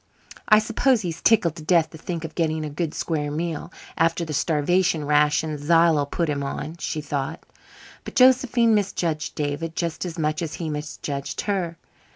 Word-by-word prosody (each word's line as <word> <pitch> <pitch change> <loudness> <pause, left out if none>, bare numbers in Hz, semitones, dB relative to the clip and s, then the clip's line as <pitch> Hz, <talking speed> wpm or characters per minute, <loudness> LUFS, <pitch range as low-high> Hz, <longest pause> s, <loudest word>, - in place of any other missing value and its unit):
"I 215 - +8
suppose 230 +3 +2
he's 170 -2 -5
tickled 175 -8 +3
to - - -7
death 160 -1 +3
to - - -10
think 170 -1 -4
of 160 - -7
getting 160 -2 -1
a 150 - -5
good 155 +1 -3
square 150 -3 -2
meal, 160 +1 -3 0.2
after 165 +1 +1
the 155 - -5
starvation 160 +1 +1
rations 150 +1 +2
Zillah 165 -2 +4
puts 165 +1 -1
him 140 -1 -2
on," 150 +4 -5
she 155 - -3
thought. 145 +1 -4 0.6
But - - -9
Josephine 250 -3 +5
misjudged 175 -6 -1
David 150 +3 -3
just 170 -2 -2
as 175 -2 -5
much 155 0 -1
as 160 -2 -4
he 160 -3 -4
misjudged 145 -1 -4
her. 180 -5 -2
160 Hz, 175 wpm, -24 LUFS, 150-175 Hz, 0.6 s, I